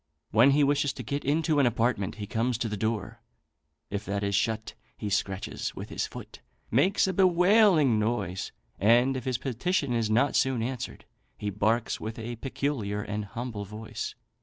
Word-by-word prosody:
When 115 +6 +6
he 145 +1 +4
wishes 145 0 +2
to 125 - -7
get 140 +6 -3
into 155 +1 +2
an 135 - +5
apartment 115 -4 0
he 105 -2 -5
comes 115 +2 0
to 120 - -1
the 105 - -3
door; 110 0 -3 0.7
if 100 0 -2
that 100 0 -2
is 100 0 -1
shut, 110 +2 0 0.2
he 105 -2 -4
scratches 100 0 -2
with - - -7
his - - -2
foot, - - -10 0.3
makes 175 - +3
a 190 - -1
bewailing 180 - +5
noise, 105 -5 -2 0.3
and, 120 +6 +4
if 130 - -4
his 130 -3 0
petition 135 +3 -1
is 115 -2 0
not 125 +6 +2
soon 130 -4 +2
answered, 125 0 -5 0.3
he 105 -1 -3
barks 110 +4 0
with 110 +1 -5
a 120 +1 -5
peculiar 115 -6 -2
and 105 0 -3
humble 115 0 -5
voice. 110 +2 -6
115 Hz, 175 wpm, -28 LUFS, 105-140 Hz, 0.7 s, When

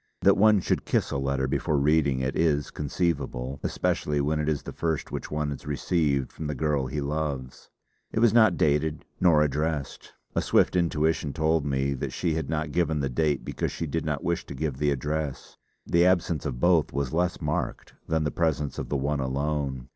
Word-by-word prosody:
That - - +5
one 105 -1 +5
should - - 0
kiss - - 0
a 70 - -1
letter 70 0 0
before 75 - 0
reading 70 -2 +2
it, 65 +1 -1
is 75 -3 +1
conceivable, 70 -4 -2
especially 75 -1 -1
when 75 +2 0
it 75 0 0
is 75 -2 -1
the - - -7
first 80 -3 -2
which - - -5
one 75 -1 -2
has 70 - -7
received 75 -2 0
from 80 - -5
the 75 - -3
girl 70 -1 0
he 75 +3 -3
loves. 70 -3 -4 0.4
It - - -5
was 115 -2 +5
not 110 -6 +5
dated 75 +1 +1
nor 80 -4 +5
addressed. 75 -1 -2 0.2
A - - +2
swift - - +3
intuition 80 -4 +1
told 80 -2 +1
me 70 0 0
that 65 - -4
she 85 -3 0
had 80 -3 -3
not 80 -1 -2
given 80 -2 +1
the 70 -2 -1
date 75 +2 0
because - - -2
she 80 - -4
did 80 +2 -2
not 75 -2 -2
wish 85 -2 -1
to 70 - -7
give 70 -1 -2
the 75 - +2
address; 70 +1 -3 0.3
the 85 0 +3
absence 85 -5 +2
of 60 -4 -4
both 85 -2 +3
was 70 -2 -2
less 90 +2 0
marked - - -3
than 80 -1 +1
the 75 - -1
presence 75 -4 -1
of - - -5
the 70 - 0
one 70 +2 -1
alone. 70 -1 -2
75 Hz, 200 wpm, -27 LUFS, 70-80 Hz, 0.4 s, That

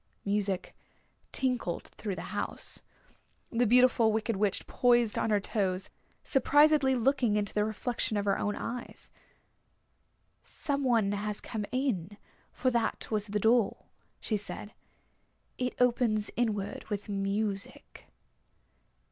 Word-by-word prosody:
Music 200 -2 -1 0.6
tinkled 250 -10 -1
through 205 -4 -5
the - - -7
house. - - -3 0.7
The 240 0 +2
Beautiful 240 -1 +5
Wicked 220 +1 0
Witch 200 0 0
poised 240 -3 +3
on - - 0
her 210 -1 +3
toes, 190 -2 -1 0.3
surprisedly 290 0 +4
looking 250 -3 +2
into 205 -1 -1
the 210 - +2
reflection 220 +1 -2
of 205 - -1
her 200 - +1
own 210 - -1
eyes. 245 +1 -6 1.3
"Some 280 -2 -3
one 230 -6 +3
has 205 0 -2
come 210 -3 -4
in, 210 -8 -1 0.3
for 255 - 0
that 235 -1 -1
was 210 -1 0
the 210 +1 -1
door," 225 0 +2 0.3
she 215 - -1
said. 205 +1 -6 0.9
"It 250 -1 -1
opens 235 -4 +2
inward 210 -4 -1
with 205 -2 -4
music." 200 0 -3
215 Hz, 120 wpm, -30 LUFS, 205-245 Hz, 1.3 s, Beautiful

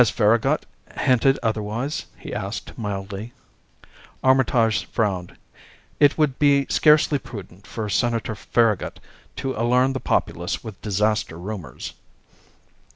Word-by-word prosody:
"Has 120 - +5
Farragut 115 +7 +2 0.3
hinted 135 +1 +3
otherwise?" 110 +5 -2
he - - -8
asked - - -5
mildly. 100 +2 -5 0.9
Armitage 125 -5 +3
frowned. 95 -5 -2 0.6
"It 145 -2 +5
would 150 -4 +1
be 140 -1 +4
scarcely 150 -1 +4
prudent 100 -5 -10
for 110 -3 -4
Senator 115 +1 0
Farragut 110 0 0 0.4
to 135 -1 -3
alarm 125 +4 +2
the 130 - -2
populace 85 -6 -1
with 110 -4 -9
disaster 105 -4 0
rumors." 90 - -6
115 Hz, 110 wpm, -23 LUFS, 105-130 Hz, 0.9 s, Has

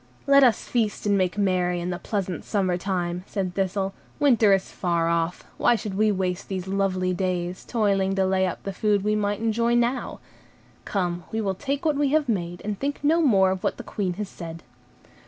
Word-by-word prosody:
"Let 275 0 +6
us 240 -4 +3
feast 220 -4 -1
and 205 -1 +3
make 185 0 0
merry 180 -3 +1
in 175 +1 -3
the 175 - -4
pleasant 190 -6 -3
summer 190 -4 0
time," 180 -1 -2
said 190 -3 -3
Thistle; 195 0 -1 0.3
"winter 235 -7 +5
is 195 -1 +2
far 170 -2 0
off, 170 +1 -1
why 240 - +4
should 215 -3 -4
we 215 +2 +3
waste 185 -2 -2
these 190 -1 -4
lovely 190 -2 0
days, 180 -1 -2
toiling 195 -4 +1
to 190 -1 +2
lay 190 0 +2
up 180 - -5
the 195 - -4
food 205 0 +1
we 210 +1 +1
might 205 0 -1
enjoy 230 +1 +1
now. 240 +2 0 0.7
Come, 175 -4 -2
we 220 - -1
will 200 -3 0
take 280 - -3
what 300 -3 +2
we 290 -1 +2
have 310 -2 +3
made, 175 -6 -2
and 205 -2 -3
think 285 +1 -3
no 320 +3 +4
more 195 - +4
of 190 -1 -4
what - - 0
the - - -7
Queen 190 -4 -2
has 205 +3 -4
said." 165 -3 -9
195 Hz, 205 wpm, -25 LUFS, 180-215 Hz, 0.7 s, Let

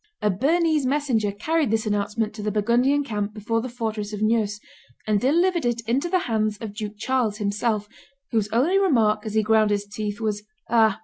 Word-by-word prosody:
A 210 - +1
Bernese 305 - +2
messenger 255 -7 +1
carried 305 +8 0
this 220 0 0
announcement 210 +1 -1
to 215 - -7
the 210 - -1
Burgundian 240 +7 +2
camp 210 -4 -3
before 225 +2 -1
the 255 - -5
fortress 220 -3 -4
of 210 0 -3
Neuss, 215 -2 +1 0.5
and 210 -2 +1
delivered 340 +5 +2
it 240 -1 0
into 250 +9 -1
the 370 - +3
hands 215 -2 0
of 215 -2 -7
Duke 210 -1 -6
Charles 230 -2 0
himself, 210 0 -1 0.4
whose 220 -3 0
only 310 - +3
remark, 225 - +2
as 215 - -4
he 220 - +3
ground 215 0 +3
his 205 -1 0
teeth, 205 0 -5
was, 210 -2 -2 0.3
"Ah! 220 -3 +4
220 Hz, 190 wpm, -24 LUFS, 210-255 Hz, 0.5 s, Ah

